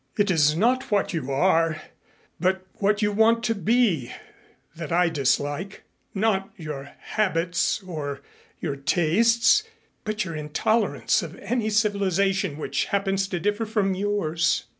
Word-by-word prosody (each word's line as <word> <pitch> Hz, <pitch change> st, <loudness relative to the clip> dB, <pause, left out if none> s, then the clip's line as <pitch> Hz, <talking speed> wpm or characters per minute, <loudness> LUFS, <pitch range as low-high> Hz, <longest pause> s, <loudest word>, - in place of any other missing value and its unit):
It 205 Hz, -1 st, +2 dB
is 150 Hz, -3 st, +3 dB
not 250 Hz, +8 st, +1 dB
what 205 Hz, -3 st, +1 dB
you 150 Hz, -6 st, -3 dB
are, 165 Hz, +1 st, +2 dB, 0.6 s
but 185 Hz, +2 st, 0 dB
what 210 Hz, +1 st, +1 dB
you 210 Hz, -, +2 dB
want 225 Hz, +2 st, +3 dB
to 225 Hz, -, +1 dB
be, 200 Hz, -, +1 dB, 0.6 s
that 160 Hz, -2 st, -7 dB
I 175 Hz, 0 st, +3 dB
dislike; 145 Hz, +5 st, -1 dB, 0.3 s
not 195 Hz, -1 st, +1 dB
your 145 Hz, -4 st, -7 dB
habits 180 Hz, -2 st, 0 dB
or 150 Hz, -6 st, -5 dB, 0.4 s
your 140 Hz, -, -3 dB
tastes, 225 Hz, -, +3 dB, 0.4 s
but 215 Hz, -1 st, -2 dB
your 165 Hz, -3 st, -5 dB
intolerance 175 Hz, +9 st, 0 dB
of 170 Hz, -1 st, -7 dB
any 220 Hz, +1 st, -2 dB
civilization 195 Hz, -4 st, +1 dB
which 155 Hz, -, -2 dB
happens 195 Hz, -1 st, 0 dB
to 180 Hz, -2 st, -3 dB
differ 205 Hz, +5 st, -1 dB
from 210 Hz, -3 st, 0 dB
yours." 185 Hz, -4 st, 0 dB
190 Hz, 135 wpm, -24 LUFS, 160-210 Hz, 0.6 s, is